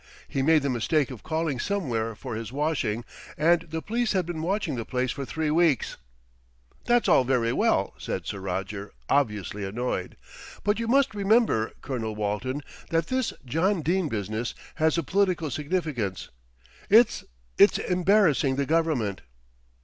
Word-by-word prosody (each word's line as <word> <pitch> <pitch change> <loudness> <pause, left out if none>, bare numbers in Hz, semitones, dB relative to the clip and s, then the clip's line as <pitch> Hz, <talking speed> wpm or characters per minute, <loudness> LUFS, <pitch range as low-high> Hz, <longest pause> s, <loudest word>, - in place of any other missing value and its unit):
He 135 - -2
made 155 +1 +4
the 140 - 0
mistake 135 +4 +1
of 125 - -9
calling 160 -4 -2
somewhere 120 - -1
for 125 +3 -7
his 110 +1 -5
washing, 130 -6 -1 0.3
and 165 +3 +4
the 160 0 -4
police 235 +1 0
had 185 -3 +1
been 165 -2 -4
watching 185 -1 -1
the 115 - -3
place 125 +1 -1
for 140 - -5
three 155 +2 -2
weeks." 160 -5 +2 0.9
"That's 240 -1 +3
all - - +5
very 120 -2 +1
well," - - +2
said - - -4
Sir 100 - -4
Roger, 95 +2 -4 0.2
obviously 105 -7 0
annoyed. 100 -1 -3 0.5
"But 205 +2 +1
you 230 - -2
must 270 0 +3
remember, 205 - +2
Colonel 115 -6 -3
Walton, 105 +7 -2 0.3
that 165 -1 0
this 260 -2 0
John 165 +7 +1
Dene 175 +1 +1
business 110 +2 -3 0.3
has 160 +1 +3
a 170 - 0
political 185 -3 +1
significance. 145 - -2 0.6
It's 230 +3 +5 0.4
it's - - +7
embarrassing 180 -7 +3
the 140 +1 0
Government." 150 - 0
150 Hz, 150 wpm, -26 LUFS, 115-175 Hz, 0.9 s, it's